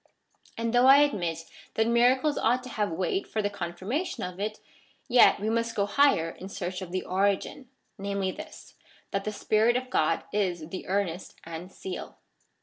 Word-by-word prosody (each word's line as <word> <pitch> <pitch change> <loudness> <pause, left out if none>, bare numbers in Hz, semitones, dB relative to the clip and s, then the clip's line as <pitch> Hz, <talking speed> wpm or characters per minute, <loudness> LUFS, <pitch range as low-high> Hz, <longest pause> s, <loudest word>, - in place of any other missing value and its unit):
And 230 0 -1
though 245 +1 +5
I 275 +2 +9
admit 170 - -2 0.3
that 220 - +3
miracles 250 +5 +3
ought 250 +1 +1
to 255 - -8
have 210 -4 -1
weight 190 - -1
for 220 - -3
the 205 - 0
confirmation 195 - -3
of 180 +1 -6
it, 215 +1 -3 0.5
yet 250 -1 +6
we 210 - -2
must 230 +1 0
go 200 - +2
higher 205 - +3
in 190 +3 -10
search 185 -1 -4
of 180 -2 -7
the 185 0 -2
origin, 200 +7 0 0.3
namely 200 -1 -1
this, - - -11 0.4
that 195 0 -2
the 215 - -1
Spirit 220 +3 +2
of 255 0 -6
God 160 -4 +1
is 180 -6 -1
the 185 - -7
earnest 190 -2 -2
and 165 +3 -8
seal. 190 -1 -7
200 Hz, 175 wpm, -28 LUFS, 185-240 Hz, 0.5 s, I